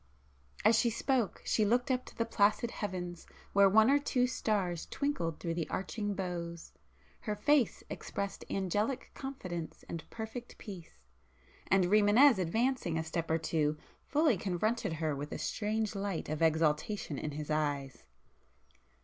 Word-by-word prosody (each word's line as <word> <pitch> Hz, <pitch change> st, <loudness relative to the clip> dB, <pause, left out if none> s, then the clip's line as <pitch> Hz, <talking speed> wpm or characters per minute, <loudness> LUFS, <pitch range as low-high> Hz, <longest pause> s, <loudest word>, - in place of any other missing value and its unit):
As 220 Hz, +1 st, +6 dB
she 235 Hz, -, +3 dB
spoke, 235 Hz, -1 st, 0 dB
she 215 Hz, -, +2 dB
looked 245 Hz, +5 st, +2 dB
up 255 Hz, 0 st, 0 dB
to -, -, -13 dB
the 230 Hz, -, +1 dB
placid 220 Hz, +1 st, +2 dB
heavens 180 Hz, -4 st, -5 dB, 0.3 s
where 200 Hz, 0 st, +6 dB
one 220 Hz, +3 st, +6 dB
or 285 Hz, -, +5 dB
two 255 Hz, -3 st, +1 dB
stars 195 Hz, -8 st, -1 dB
twinkled 280 Hz, -, -2 dB
through 165 Hz, -2 st, -2 dB
the 165 Hz, -1 st, -3 dB
arching 205 Hz, +2 st, -2 dB
boughs,—her 175 Hz, +3 st, -6 dB
face 260 Hz, +3 st, +2 dB
expressed 200 Hz, 0 st, -4 dB
angelic 205 Hz, +7 st, -1 dB
confidence 185 Hz, -, -6 dB
and 165 Hz, -2 st, -5 dB
perfect 225 Hz, +2 st, -7 dB
peace,—and 70 Hz, -, -4 dB
Rimânez 210 Hz, +5 st, +6 dB
advancing 205 Hz, -1 st, 0 dB
a 160 Hz, -, 0 dB
step 165 Hz, +1 st, -3 dB
or 160 Hz, -, +3 dB
two, 155 Hz, -2 st, 0 dB, 0.3 s
fully 295 Hz, -6 st, +3 dB
confronted 205 Hz, +2 st, -1 dB
her 155 Hz, -2 st, -1 dB
with 145 Hz, +2 st, -5 dB
a -, -, -3 dB
strange 215 Hz, 0 st, -1 dB
light 195 Hz, -5 st, -3 dB
of 155 Hz, +1 st, -3 dB
exultation 160 Hz, +1 st, +1 dB
in 150 Hz, -, -4 dB
his 150 Hz, +1 st, -5 dB
eyes. 145 Hz, -3 st, -1 dB
195 Hz, 140 wpm, -32 LUFS, 165-225 Hz, 0.3 s, As